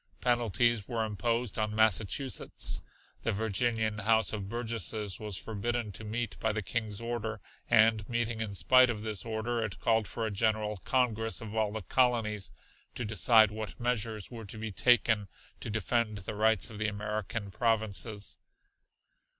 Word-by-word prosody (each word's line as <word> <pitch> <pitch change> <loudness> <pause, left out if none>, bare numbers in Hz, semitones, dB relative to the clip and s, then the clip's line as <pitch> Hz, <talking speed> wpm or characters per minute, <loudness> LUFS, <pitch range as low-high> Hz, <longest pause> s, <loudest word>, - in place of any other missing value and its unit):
Penalties 120 -2 +1
were 115 -3 -1
imposed 115 +2 -2
on 105 0 -1
Massachusetts. 110 +4 +2 0.4
The - - 0
Virginian 110 +1 0
House 110 0 +3
of 100 -2 -4
Burgesses 110 -3 -1
was 105 -4 -4
forbidden 115 +2 -3
to 110 - -6
meet 110 +1 -4
by 110 - +1
the 110 -1 -3
King's 110 -1 -2
order, 115 -2 -4 0.3
and 110 -1 +4
meeting 115 -1 -1
in 105 -3 -3
spite 130 +8 +6
of 105 -3 -3
this 110 -3 -1
order 115 +1 -2
it 100 -4 -5
called 110 -2 +2
for 115 - -3
a 110 - -2
General 105 0 0
Congress 115 0 0
of 110 -1 -8
all 110 -2 +1
the 110 -1 -5
Colonies 110 -4 +1 0.4
to 120 - -3
decide 110 +1 +5
what 110 0 -6
measures 115 -3 -2
were 115 -2 -8
to 100 - -8
be 110 0 -5
taken 110 -1 +3 0.3
to - - -6
defend 110 +1 0
the 100 +2 -5
rights 110 0 +2
of 105 - -9
the 110 - 0
American 105 0 -4
provinces. 110 -1 0
110 Hz, 160 wpm, -30 LUFS, 105-115 Hz, 0.4 s, spite